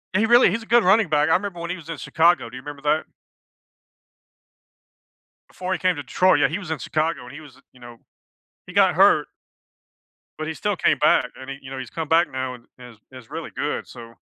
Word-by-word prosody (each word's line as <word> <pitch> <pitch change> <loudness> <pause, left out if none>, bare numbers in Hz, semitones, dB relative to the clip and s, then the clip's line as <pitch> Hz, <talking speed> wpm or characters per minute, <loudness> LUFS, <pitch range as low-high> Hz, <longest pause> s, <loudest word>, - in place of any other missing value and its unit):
He 215 +3 +3
really 240 -2 +6
he's 225 +4 -3
a - - -14
good 235 0 +4
running 200 +3 +4
back. 150 0 +2
I - - +4
remember 185 0 -1
when 170 0 -5
he 180 - -2
was 165 -2 -13
in 165 - -5
Chicago. 165 -5 +2
Do 125 - -10
you 130 - -11
remember 145 -1 -9
that? 150 +1 +1 2.4
Before 185 +1 -4
he - - -3
came 185 -1 +1
to 145 - -6
Detroit, 180 +4 +3
yeah, 145 - +4
he 170 - -4
was 180 -5 -9
in 160 - -1
Chicago, 155 -1 -2
and 125 - -12
he 150 - -10
was, 145 -4 -16
you 130 - -20
know 120 -1 -12 0.7
he 180 - -12
got 190 -3 +4
hurt 185 -4 +4 1.1
but 155 - -5
he 160 - -3
still 205 +5 -2
came - - +2
back, 140 -4 +3
and 130 +1 -10
he 135 - -7
you 130 - -11
know, 135 - -6
he's 130 -3 -7
come 160 -2 -5
back 165 +2 +3
now, 130 -1 -4
and 120 -1 -14
is 125 -3 -13
is 130 -1 -13
really 165 0 -6
good, 145 +1 -4
so 115 0 -12
155 Hz, 230 wpm, -22 LUFS, 130-180 Hz, 2.4 s, really